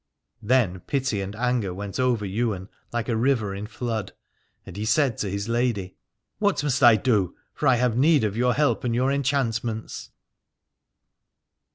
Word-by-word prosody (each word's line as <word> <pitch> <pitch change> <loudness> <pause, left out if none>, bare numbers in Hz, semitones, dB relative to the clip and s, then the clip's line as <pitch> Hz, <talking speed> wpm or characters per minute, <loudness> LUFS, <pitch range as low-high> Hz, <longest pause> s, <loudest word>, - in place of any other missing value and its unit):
Then 105 -6 +2
pity 130 -7 -1
and 100 +2 -5
anger 120 -5 -1
went 100 +2 -6
over 125 -5 +1
Ywain 100 -1 -2 0.2
like 120 -1 -2
a 120 - 0
river 115 -4 +1
in 100 +2 -6
flood, 115 -3 -4 0.5
and 95 - -10
he 105 - -4
said 115 +3 +2
to 100 - -1
his 100 +2 -3
lady: 115 -6 -1 0.4
What 205 -7 +1
must 140 -2 0
I 120 -4 +8
do, 105 -5 +1 0.2
for 150 - -1
I 130 - +6
have 120 -1 +1
need 145 +1 +4
of 105 -1 -1
your 125 +1 +2
help 150 -1 +1
and 120 -2 0
your 130 +3 +2
enchantments. 120 -5 -2
115 Hz, 165 wpm, -25 LUFS, 105-130 Hz, 0.5 s, I